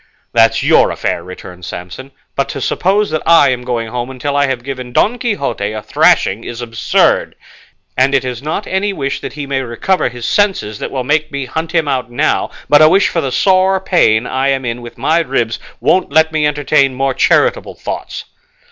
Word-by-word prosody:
"That's 115 Hz, -1 st, +3 dB
your -, -, +4 dB
affair," 85 Hz, -, -2 dB
returned 90 Hz, 0 st, -11 dB
Samson, 90 Hz, +10 st, -8 dB, 0.3 s
"but 140 Hz, 0 st, -1 dB
to -, -, -5 dB
suppose 200 Hz, +2 st, 0 dB
that 155 Hz, -, -1 dB
I 170 Hz, -4 st, +5 dB
am 125 Hz, -1 st, -2 dB
going 120 Hz, -2 st, -3 dB
home 120 Hz, +1 st, -4 dB
until 135 Hz, +2 st, -4 dB
I 145 Hz, 0 st, +3 dB
have 130 Hz, -2 st, -3 dB
given 130 Hz, -2 st, -6 dB
Don 240 Hz, -, +2 dB
Quixote 140 Hz, -, -2 dB
a 110 Hz, -, -5 dB
thrashing 100 Hz, +4 st, +2 dB
is 120 Hz, -, -7 dB
absurd; 115 Hz, -2 st, +1 dB, 0.6 s
and 135 Hz, +2 st, +2 dB
it 130 Hz, -2 st, +1 dB
is 125 Hz, -1 st, -4 dB
not 155 Hz, +8 st, -3 dB
any 195 Hz, +2 st, -1 dB
wish 140 Hz, -5 st, -3 dB
that -, -, -6 dB
he 145 Hz, -1 st, -5 dB
may 135 Hz, -1 st, -2 dB
recover 130 Hz, +8 st, -1 dB
his 120 Hz, -1 st, -8 dB
senses 190 Hz, -, 0 dB
that -, -, -4 dB
will 130 Hz, -2 st, -3 dB
make 150 Hz, +3 st, 0 dB
me 140 Hz, -2 st, -3 dB
hunt 160 Hz, +5 st, -4 dB
him 165 Hz, -3 st, +1 dB
out 130 Hz, -3 st, -1 dB
now, 120 Hz, -, 0 dB, 0.2 s
but 145 Hz, +2 st, +5 dB
a 155 Hz, -, +7 dB
wish 195 Hz, +3 st, +3 dB
for 165 Hz, -, -1 dB
the 135 Hz, -, -3 dB
sore 190 Hz, +4 st, +3 dB
pain 125 Hz, -, +2 dB
I 130 Hz, +2 st, -1 dB
am 135 Hz, -1 st, 0 dB
in 120 Hz, 0 st, -3 dB
with 120 Hz, -1 st, -11 dB
my 155 Hz, +7 st, +2 dB
ribs 125 Hz, -8 st, -1 dB, 0.2 s
won't 185 Hz, -5 st, +1 dB
let 160 Hz, +2 st, +3 dB
me 155 Hz, -1 st, +1 dB
entertain 145 Hz, -2 st, +1 dB
more 135 Hz, +1 st, 0 dB
charitable -, -, +1 dB
thoughts." -, -, -6 dB
135 Hz, 200 wpm, -15 LUFS, 120-160 Hz, 0.6 s, a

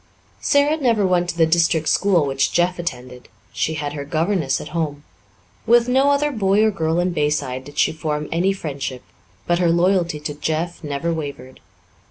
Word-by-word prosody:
Sara 285 Hz, +2 st, +2 dB
never 230 Hz, -8 st, +2 dB
went 180 Hz, -1 st, +1 dB
to 170 Hz, -, -4 dB
the 165 Hz, -, +5 dB
district 165 Hz, -1 st, +2 dB
school 185 Hz, -6 st, +3 dB
which 135 Hz, -1 st, 0 dB
Jeff 175 Hz, +1 st, +1 dB
attended; 125 Hz, -6 st, -6 dB, 0.3 s
she 160 Hz, -, -1 dB
had 145 Hz, -1 st, -4 dB
her 145 Hz, -1 st, -5 dB
governess 160 Hz, -1 st, 0 dB
at 150 Hz, -, -8 dB
home. 150 Hz, -4 st, -3 dB, 0.6 s
With 235 Hz, +1 st, +5 dB
no 265 Hz, +3 st, +3 dB
other 290 Hz, +1 st, +2 dB
boy 205 Hz, -3 st, +2 dB
or 220 Hz, -, +3 dB
girl 160 Hz, -4 st, -1 dB
in 180 Hz, +1 st, +1 dB
Bayside 145 Hz, -5 st, -1 dB
did 145 Hz, +1 st, -13 dB
she -, -, +3 dB
form 150 Hz, -1 st, -3 dB
any 175 Hz, +4 st, +2 dB
friendship, 140 Hz, -8 st, -5 dB, 0.4 s
but 175 Hz, 0 st, +1 dB
her 175 Hz, -2 st, +2 dB
loyalty 170 Hz, -2 st, +2 dB
to 150 Hz, 0 st, -4 dB
Jeff 160 Hz, +4 st, -3 dB
never 150 Hz, +3 st, -2 dB
wavered. 140 Hz, -5 st, -7 dB
165 Hz, 180 wpm, -21 LUFS, 145-185 Hz, 0.6 s, the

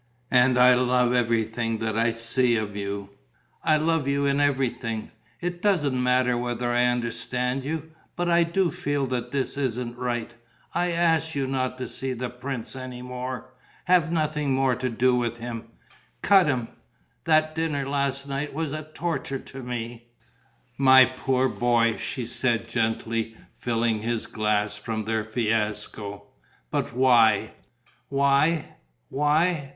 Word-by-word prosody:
And 125 Hz, 0 st, +4 dB
I 125 Hz, 0 st, +7 dB
love 125 Hz, 0 st, +2 dB
everything 115 Hz, -1 st, 0 dB
that 110 Hz, -1 st, -2 dB
I 115 Hz, +1 st, +2 dB
see 115 Hz, +2 st, +2 dB
of 105 Hz, -2 st, -3 dB
you: 100 Hz, 0 st, -4 dB, 0.5 s
I 155 Hz, -1 st, +4 dB
love 160 Hz, -2 st, +1 dB
you 140 Hz, 0 st, +1 dB
in 140 Hz, 0 st, +2 dB
everything. 125 Hz, -5 st, -1 dB, 0.3 s
It 175 Hz, 0 st, -3 dB
doesn't 150 Hz, -11 st, +2 dB
matter 125 Hz, 0 st, +2 dB
whether 120 Hz, 0 st, -2 dB
I 120 Hz, 0 st, +3 dB
understand 125 Hz, +2 st, -1 dB
you. 160 Hz, +2 st, -4 dB, 0.2 s
But 175 Hz, 0 st, -1 dB
I 170 Hz, 0 st, +4 dB
do 170 Hz, +1 st, +1 dB
feel 145 Hz, -1 st, -1 dB
that 125 Hz, -2 st, -3 dB
this 140 Hz, 0 st, -2 dB
isn't 125 Hz, -3 st, -2 dB
right. 120 Hz, -2 st, -2 dB, 0.4 s
I 175 Hz, +1 st, +1 dB
ask 165 Hz, -2 st, +1 dB
you 140 Hz, -1 st, 0 dB
not 130 Hz, -1 st, -2 dB
to 130 Hz, -, -4 dB
see 130 Hz, -1 st, -3 dB
the 125 Hz, 0 st, -4 dB
prince 125 Hz, 0 st, -5 dB
any 130 Hz, -1 st, -7 dB
more. 125 Hz, 0 st, -6 dB, 0.3 s
Have 175 Hz, -3 st, +3 dB
nothing 150 Hz, -4 st, 0 dB
more 135 Hz, -1 st, +2 dB
to 125 Hz, +1 st, -2 dB
do 125 Hz, +2 st, +2 dB
with 120 Hz, -1 st, -1 dB
him. 120 Hz, -1 st, -6 dB, 0.6 s
Cut 195 Hz, -3 st, +6 dB
him.... 125 Hz, -5 st, -1 dB, 0.6 s
That 155 Hz, -1 st, +3 dB
dinner, 155 Hz, -4 st, -1 dB
last 140 Hz, 0 st, -1 dB
night, 140 Hz, +1 st, -3 dB
was 155 Hz, -2 st, -2 dB
a 155 Hz, -, -3 dB
torture 155 Hz, -2 st, -3 dB
to 135 Hz, +1 st, -10 dB
me...." 120 Hz, -1 st, -6 dB, 0.7 s
"My 130 Hz, -1 st, +8 dB
poor 130 Hz, 0 st, 0 dB
boy," 120 Hz, -3 st, +2 dB
she 125 Hz, -, -4 dB
said, 115 Hz, -1 st, 0 dB
gently, 115 Hz, -1 st, -1 dB, 0.2 s
filling 115 Hz, -2 st, 0 dB
his 115 Hz, 0 st, -2 dB
glass 105 Hz, -1 st, -1 dB
from 110 Hz, 0 st, -4 dB
their 110 Hz, 0 st, 0 dB
fiasco, 105 Hz, -2 st, -2 dB, 0.5 s
"but -, -, -1 dB
why?" 115 Hz, -4 st, +4 dB, 0.6 s
"Why? 140 Hz, +3 st, +3 dB, 0.4 s
Why? 150 Hz, +1 st, +1 dB
125 Hz, 145 wpm, -25 LUFS, 115-140 Hz, 0.7 s, My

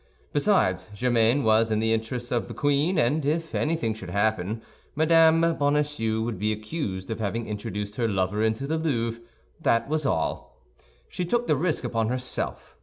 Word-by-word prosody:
Besides, 145 Hz, -, +2 dB
Germain 120 Hz, +3 st, +2 dB
was 110 Hz, 0 st, +4 dB
in 110 Hz, -, +1 dB
the 110 Hz, +1 st, +2 dB
interests 120 Hz, +2 st, -3 dB
of 120 Hz, -2 st, 0 dB
the -, -, -8 dB
queen; 145 Hz, +5 st, +1 dB
and 150 Hz, +2 st, +2 dB
if 160 Hz, +3 st, -1 dB
anything 150 Hz, -8 st, 0 dB
should 100 Hz, -5 st, -9 dB
happen, 105 Hz, +2 st, 0 dB, 0.3 s
Mme. 165 Hz, +1 st, +5 dB
Bonacieux 145 Hz, -6 st, +1 dB
would 115 Hz, -4 st, -3 dB
be 105 Hz, +2 st, +1 dB
accused 110 Hz, -, -4 dB
of 110 Hz, -, -3 dB
having 115 Hz, +2 st, -2 dB
introduced 105 Hz, -1 st, -5 dB
her 115 Hz, -, +1 dB
lover 95 Hz, 0 st, 0 dB
into 110 Hz, +4 st, 0 dB
the 160 Hz, +3 st, -1 dB
Louvre, 115 Hz, -7 st, -1 dB, 0.4 s
that 115 Hz, +1 st, +2 dB
was 155 Hz, +1 st, 0 dB
all. 80 Hz, -, -2 dB, 0.5 s
She 180 Hz, -, -4 dB
took 240 Hz, +7 st, 0 dB
the 150 Hz, -, +2 dB
risk 160 Hz, +1 st, 0 dB
upon 115 Hz, -2 st, 0 dB
herself. 125 Hz, -, -3 dB
115 Hz, 170 wpm, -26 LUFS, 110-150 Hz, 0.5 s, Mme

